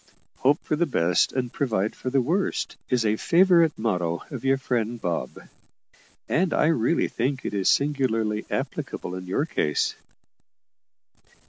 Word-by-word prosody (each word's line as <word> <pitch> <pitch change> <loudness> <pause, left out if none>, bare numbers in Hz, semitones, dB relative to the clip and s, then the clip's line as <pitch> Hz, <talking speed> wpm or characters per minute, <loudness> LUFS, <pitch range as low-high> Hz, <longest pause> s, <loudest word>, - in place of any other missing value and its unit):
`Hope 140 +3 +4
for - - -1
the 170 +2 +1
best 90 - +2
and 125 -2 -3
provide 110 -6 -1
for 130 - -4
the 135 0 +2
worst' 180 +9 -1
is 125 -3 +1
a 105 0 +2
favourite 170 - +4
motto 90 -7 -1
of - - -6
your 135 0 +3
friend 120 -3 -2
Bob; 85 -5 -3 0.9
and 180 +1 +1
I - - +3
really 165 +1 +2
think 130 +2 -2
it - - -3
is 100 -2 +1
singularly 115 -7 +1
applicable 90 - -4
in 90 0 -6
your 120 +11 0
case." 75 - 0
125 Hz, 145 wpm, -25 LUFS, 105-145 Hz, 0.9 s, `Hope